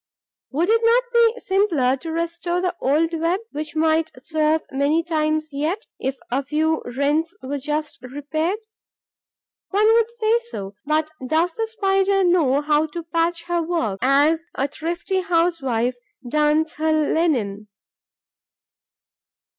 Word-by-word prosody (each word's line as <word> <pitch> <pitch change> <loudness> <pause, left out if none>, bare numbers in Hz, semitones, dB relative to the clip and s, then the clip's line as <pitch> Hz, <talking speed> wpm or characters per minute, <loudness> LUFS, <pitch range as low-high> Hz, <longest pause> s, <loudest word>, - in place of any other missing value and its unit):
Would 330 +7 0
it 455 0 +4
not 470 +2 +4
be 470 0 +4
simpler 345 -10 +2
to 325 +4 -6
restore 340 +1 -2
the 360 -1 -1
old 315 +5 +2
web, 335 +3 0
which 300 +1 -5
might 320 0 +2
serve 310 +3 0
many 285 +5 +1
times 310 -1 0
yet, 315 - -2
if 265 +1 -2
a 270 +3 0
few 315 +3 0 0.2
rents 305 +4 +1
were 280 +2 -3
just 300 0 -3
repaired? 295 - -2 1.1
One 415 +2 +2
would 460 0 +3
say 465 0 +1
so; 195 - -6
but 310 0 +1 0.2
does 325 +4 +1
the 450 +3 -2
Spider 390 -3 +1
know 315 -6 +3
how 300 +1 +2
to 335 +2 -6
patch 335 +1 -1
her 345 0 -1
work, 320 - -1
as 290 +5 +3
a 275 - 0
thrifty 340 +6 -3
housewife 325 -10 0 0.3
darns 300 +3 +2
her 315 +1 +1
linen? 290 -10 0
315 Hz, 135 wpm, -22 LUFS, 290-350 Hz, 1.1 s, it